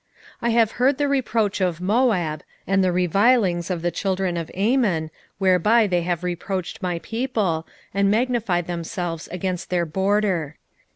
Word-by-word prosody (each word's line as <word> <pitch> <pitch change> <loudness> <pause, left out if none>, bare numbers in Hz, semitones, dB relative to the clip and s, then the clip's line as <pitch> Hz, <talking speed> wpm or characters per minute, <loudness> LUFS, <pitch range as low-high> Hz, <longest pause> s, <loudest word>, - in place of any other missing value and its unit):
2:8 235 - 0
I - - +2
have 225 -2 +3
heard 260 +3 +2
the 290 0 +1
reproach 230 -7 0
of 175 -3 0
Moab, 185 - +1 0.2
and 195 0 +2
the 185 - +2
revilings 180 0 +2
of 175 -3 -3
the 175 - +1
children 190 -2 -1
of 165 -2 -4
Ammon, 195 -7 +1 0.3
whereby 195 +4 +4
they 180 -3 +1
have 175 0 -2
reproached 180 +2 -4
my 180 -2 -1
people, 215 -9 -1 0.3
and 200 0 +2
magnified 220 -6 +1
themselves 170 -1 -4
against 180 -1 -4
their 175 -1 +1
border. 190 -3 0
185 Hz, 155 wpm, -23 LUFS, 175-220 Hz, 0.3 s, whereby